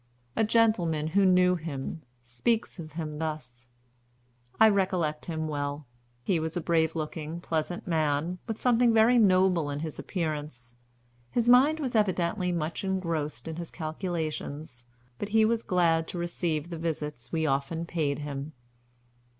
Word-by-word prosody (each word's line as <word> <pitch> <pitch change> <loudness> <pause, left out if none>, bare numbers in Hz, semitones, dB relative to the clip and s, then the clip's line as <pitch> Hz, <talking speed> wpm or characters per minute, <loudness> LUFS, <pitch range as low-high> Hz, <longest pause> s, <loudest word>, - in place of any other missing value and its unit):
A - - +2
gentleman 195 -9 +2
who 195 +4 +3
knew 180 0 +4
him 160 -1 -5 0.2
speaks 175 - -1
of 155 -3 -8
him 155 -2 -5
thus: 125 -7 -5 0.9
'I 220 0 +8
recollect 185 -6 0
him 160 -2 -3
well. 145 0 -3 0.4
He 175 +4 +1
was 160 +2 -3
a - - +1
brave 165 -1 +1
looking, 155 +1 -4
pleasant 170 +1 -3
man, 160 +1 0
with 225 -2 -4
something 240 -1 +3
very 230 +2 +6
noble 185 -6 +4
in 145 +1 -3
his 155 -2 -5
appearance. 150 -8 -4 0.5
His 240 - 0
mind 270 +6 +6
was 265 -5 -2
evidently 185 -2 +1
much 165 0 -2
engrossed 165 -9 -2
in 160 -1 -5
his 170 -1 -6
calculations, 155 -5 -4 0.3
but 205 - -3
he 220 +1 +4
was 230 +1 +1
glad 165 -5 +2
to - - -6
receive 170 -2 -2
the 165 - -5
visits 150 -7 -4
we 160 -1 0
often 140 +4 -1
paid 155 -5 -1
him.' 145 0 -5
165 Hz, 150 wpm, -28 LUFS, 150-185 Hz, 0.9 s, I